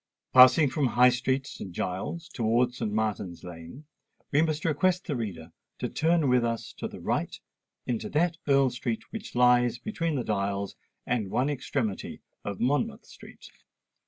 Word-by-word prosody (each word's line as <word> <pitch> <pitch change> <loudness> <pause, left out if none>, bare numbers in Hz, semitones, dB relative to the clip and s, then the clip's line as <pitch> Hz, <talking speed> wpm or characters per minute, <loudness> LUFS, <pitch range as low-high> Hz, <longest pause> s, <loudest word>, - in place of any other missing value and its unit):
Passing 130 +4 +8
from 140 0 +1
High 125 +1 +5
Street, 130 +2 0
St. 100 -8 -8
Giles's, 95 - -4
towards 120 +2 +1
St. 105 - -2
Martin's 105 -5 -2
Lane, 85 - -10 0.5
we 145 - +4
must 160 -1 -1
request 180 +4 +1
the 150 - -2
reader 90 -8 -5 0.3
to - - -3
turn 165 -2 +2
with 125 -1 +3
us 115 -1 -3
to - - -3
the - - -10
right - - -2 0.5
into 120 -3 -2
that 165 +2 +1
Earl 135 -2 +4
Street 120 -2 -3
which 225 - -7
lies 125 -1 +4
between 165 - -2
the 130 - -1
Dials 100 -2 -2 0.3
and 115 -5 -1
one 130 +8 +1
extremity 125 -6 -3 0.2
of 100 -2 -5
Monmouth 210 - 0
Street. - - -14
125 Hz, 160 wpm, -28 LUFS, 110-150 Hz, 0.5 s, Passing